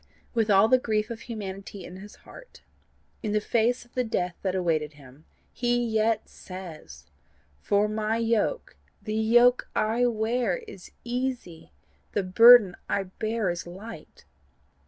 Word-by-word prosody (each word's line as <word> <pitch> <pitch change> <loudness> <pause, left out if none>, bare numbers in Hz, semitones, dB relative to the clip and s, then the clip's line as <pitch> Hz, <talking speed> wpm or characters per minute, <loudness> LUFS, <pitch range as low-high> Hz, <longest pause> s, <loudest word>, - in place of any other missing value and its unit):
With 225 -3 +1
all 200 +1 +6
the 255 +2 +4
grief 215 -1 -1
of 230 - -6
humanity 200 -4 -7
in 180 - -10
his 205 +2 -12
heart, - - -15 0.6
in 210 - -2
the 210 - +3
face 235 +3 0
of 240 - -28
the 250 - 0
death 180 -6 -2
that 190 -1 -1
awaited 160 -4 0
him, 140 +1 -17 0.3
he 240 0 0
yet 220 -2 0
says, 165 - -11 0.5
FOR 205 - +1
MY 215 +1 -1
YOKE, 230 - -1 0.3
THE 215 - -4
YOKE 240 +3 +4
I 230 +3 +2
WEAR, 225 -3 -1
IS 190 - -11
EASY, 245 -8 -4 0.4
THE 205 - 0
BURDEN 210 0 +7
I 195 - 0 0.2
BEAR 220 -3 -1
IS 175 0 -6
LIGHT. 200 +6 -11
215 Hz, 145 wpm, -26 LUFS, 185-235 Hz, 0.6 s, BURDEN